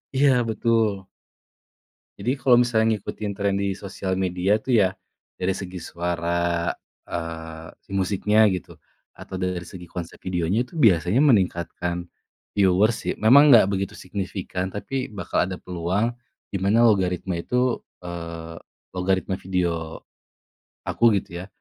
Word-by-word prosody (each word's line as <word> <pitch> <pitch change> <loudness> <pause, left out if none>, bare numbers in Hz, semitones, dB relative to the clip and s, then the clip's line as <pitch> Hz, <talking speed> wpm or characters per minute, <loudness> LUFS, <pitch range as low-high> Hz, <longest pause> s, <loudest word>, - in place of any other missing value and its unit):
Iya 140 +1 +5 0.2
betul. 110 -3 +1 1.1
Jadi 125 +3 0
kalau 125 -3 +4
misal 120 -2 +3
ngikutin 110 -1 -2
tren 100 0 -1
di 100 0 0
sosial 95 -1 -4
media 95 +3 +1
tuh 125 +3 0
ya, 95 -4 +4 0.5
dari 95 +1 0
segi 95 -2 -6
suara, 85 0 -1 0.4
eee, 80 -1 -6 0.2
musiknya 105 +3 +3
gitu 90 -1 -5 0.4
atau 95 - -7
dari 90 -1 -2
segi 90 0 -10
konsep 85 -1 -7
videonya 90 +5 0
itu - - -16
biasanya 105 - +4
meningkatkan 90 - +1 0.4
viewers 100 +3 +3
sih, - - 0
memang 140 +7 +7
gak 100 -3 +5
begitu 95 -1 -2
signifikan, 95 -1 -4
tapi 130 +7 -4
bakal 100 -3 -1
ada 95 - -4
peluang 90 +6 -1 0.4
di 100 - -2
mana 105 +5 +3
logaritma 95 -4 +2
itu, 125 +6 0 0.2
eee, 85 -1 -7 0.3
logaritma 95 0 -1
video 85 -3 -2 0.9
aku - - -1 0.2
gitu 85 0 -8
ya - - -11
95 Hz, 130 wpm, -24 LUFS, 85-105 Hz, 1.1 s, memang